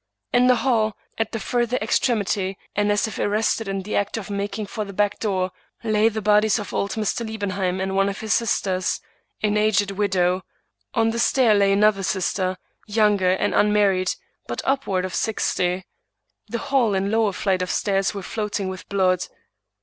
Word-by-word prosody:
In 245 +1 +5
the 250 - +6
hall, 220 -5 +2 0.2
at 225 -1 0
the 225 - -3
further 240 +3 0
extremity, 200 -7 0 0.2
and 205 0 +2
as 205 +2 +1
if 220 - -7
arrested 215 +1 0
in 195 -1 -3
the 210 - -4
act 205 +2 0
of 210 -1 -6
making 200 +1 -3
for 215 +2 -4
the 200 -1 -8
back 205 +1 0
door, 190 -4 -1 0.3
lay 215 0 +3
the 220 -1 -5
bodies 210 0 +4
of 210 - -6
old 200 - -1
Mr. 220 +1 -1
Liebenheim 195 -4 -2
and 190 0 -2
one 195 0 +3
of 200 - -5
his 220 0 0
sisters, 190 -5 0 0.4
an 210 0 +2
aged 205 -2 +2
widow; 185 -2 +1 0.5
on 225 -1 +3
the 230 - -3
stair 240 -2 +4
lay 200 -1 +4
another 205 0 +3
sister, 185 -1 -1 0.3
younger 205 -3 +3
and 205 +2 0
unmarried, 205 -3 +3 0.3
but - - -4
up 270 0 0
ward 185 -1 0
of 185 - -6
sixty. 185 -4 0 0.6
The 235 - -3
hall 255 -5 +1
and 195 +1 0
lower 220 -2 +2
flight 190 -1 0
of 180 - -2
stairs 195 -2 +1
were 200 - -5
floating 210 -1 -3
with 185 -1 -8
blood. 185 -2 +1
205 Hz, 180 wpm, -23 LUFS, 190-220 Hz, 0.6 s, the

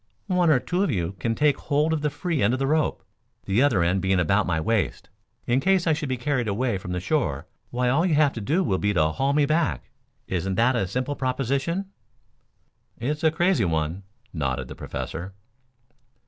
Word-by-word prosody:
One 180 -4 +2
or 145 -5 +5
two 175 +8 -1
of 200 - +1
you 90 - -1
can 115 +6 -1
take 150 0 +3
hold 150 +2 +1
of 155 - -1
the 150 - +1
free 155 +1 -2
end 105 +4 +3
of - - +1
the 135 - +1
rope, 155 +2 0 0.4
the 100 +5 +2
other 120 -11 +3
end 90 +3 +1
being 95 0 +2
about 95 +4 +2
my 80 -3 0
waist. 110 +5 -1 0.4
In 120 +2 +2
case 190 +3 +2
I 160 - +3
should 150 -2 -3
be 130 - -1
carried 125 -2 -1
away 110 0 0
from 90 - -7
the 90 - -1
shore, 90 - -1 0.2
why 125 0 -1
all 140 +7 +3
you 175 -4 +2
have 145 -1 +3
to 115 - -5
do 160 - +1
will 95 -5 0
be 105 0 0
to 80 -2 +4
haul 135 - 0
me 145 0 +3
back. 155 +2 0 0.3
Isn't 95 +1 -2
that 120 +4 +3
a 100 -5 0
simple 130 +8 -2
proposition?" 140 +9 -1 1.1
"It's 150 +6 -3
a 160 - +6
crazy 170 - +2
one," 80 +2 -1 0.3
nodded 65 -6 -2
the - - -8
Professor. 90 +4 -6
130 Hz, 205 wpm, -25 LUFS, 95-150 Hz, 1.1 s, a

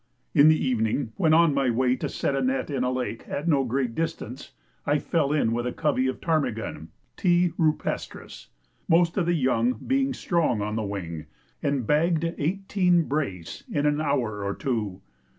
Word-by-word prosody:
In 145 - +7
the 155 0 +6
evening, 115 -1 0
when 160 -4 +2
on 165 -1 +5
my 135 -2 +1
way 125 +2 +2
to - - -3
set 140 - -1
a 135 - 0
net 130 +2 -1
in 135 -3 -1
a 125 - +1
lake 125 -3 -3
at 150 +4 -3
no 145 -5 +3
great 125 -1 -1
distance, 160 -5 -4 0.3
I 145 +1 +2
fell 150 -1 0
in 145 -7 +2
with 120 +1 -1
a - - -1
covey 145 -4 0
of 130 - -3
ptarmigan, 130 - -2 0.3
(T. 175 -1 +2
rupestris), 155 -3 -2 0.4
most 170 0 +4
of 175 -3 +1
the 175 - +2
young 125 -4 +2
being 270 - -1
strong 165 - 0
on 105 +1 -2
the 110 - -1
wing, 90 -6 -5 0.3
and 140 -4 0
bagged 160 +4 +2 0.2
eighteen 180 +1 +1
brace 135 - -4
in 145 0 -1
an 150 +1 +2
hour 120 -9 -1
or 100 0 -2
two. 105 -8 -3
140 Hz, 180 wpm, -26 LUFS, 120-160 Hz, 0.4 s, In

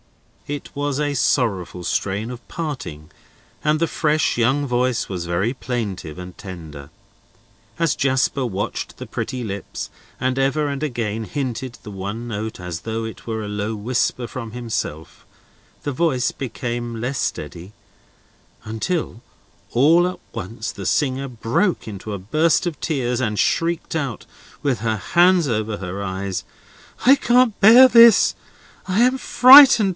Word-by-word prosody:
It 145 -1 -5
was 145 0 -2
a 145 -1 0
sorrowful 115 -9 0
strain 100 +4 -2
of 120 -3 -10
parting, 130 - -6 0.5
and 150 +1 +2
the 165 - +1
fresh 155 -3 0
young 130 +5 +2
voice 125 -2 0
was 90 -3 -4
very 90 +8 0
plaintive 105 - -4
and 90 0 -9
tender. 80 -7 -9 0.9
As 165 -3 +2
Jasper 130 0 +1
watched 105 -2 -4
the - - -7
pretty 125 -1 -4
lips, 100 -2 -6 0.3
and 130 +1 -1
ever 140 +3 +1
and 140 0 -4
again 115 -6 -2
hinted 125 +2 -4
the 105 - -8
one 100 +5 -5
note, 110 -1 -5
as 90 -2 -6
though 115 +2 -3
it 110 - -9
were 110 -1 -3
a - - -5
low 105 +2 -3
whisper 120 +2 -1
from 115 -2 -7
himself, 115 -10 -5 0.6
the 145 - -2
voice 130 -4 +1
became 120 -2 -5
less 125 +3 -3
steady, 90 +4 -4 0.9
until 115 +4 -3 0.5
all 160 +8 +4
at 180 - -5
once 110 +1 -5
the - - -6
singer 135 -2 0
broke 120 - -1
into 105 0 -7
a 100 - -4
burst 155 - +1
of 160 -5 -4
tears, 125 -6 -1
and 105 -4 -1
shrieked 165 0 0
out, 140 -8 -3 0.4
with 135 -4 0
her 110 -1 -1
hands 175 - +3
over 110 -3 -1
her 95 +2 -5
eyes: 95 0 -3 0.6
"I 265 +3 +8
can't 245 -4 +3
bear 235 +6 +9
this! 235 -2 +7 0.5
I 190 +4 +2
am 255 +2 +4
frightened! 255 -6 +8
120 Hz, 145 wpm, -21 LUFS, 105-145 Hz, 0.9 s, bear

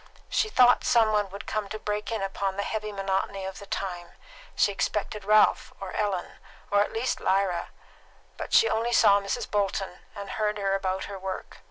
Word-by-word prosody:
She 435 - +1
thought 250 - +5
some 225 -2 +4
one 210 -2 +1
would 200 +2 -8
come 215 -2 -3
to 215 - -4
break 210 +1 -3
in 220 -3 -2
upon 195 0 -2
the 200 - 0
heavy 215 0 -3
monotony 195 0 -2
of 190 0 -6
the 200 - -11
time; 175 -3 -4 0.4
she 205 - +3
expected 210 +1 -2
Ralph 215 +4 +4
or 195 -1 -6
Ellen, 200 -4 -2 0.3
or 205 0 +4
at 205 - 0
least 230 +3 -1
Lyra; 190 -2 0 0.7
but - - -7
she 455 - +6
only 230 +2 0
saw 200 -3 +6
Mrs. 195 - -3
Bolton, 195 -3 -1 0.2
and 200 -1 -7
heard 210 -1 -1
her 195 -1 0
about 190 -1 -1
her 200 -1 -7
work. 190 0 -6
200 Hz, 190 wpm, -27 LUFS, 195-215 Hz, 0.7 s, she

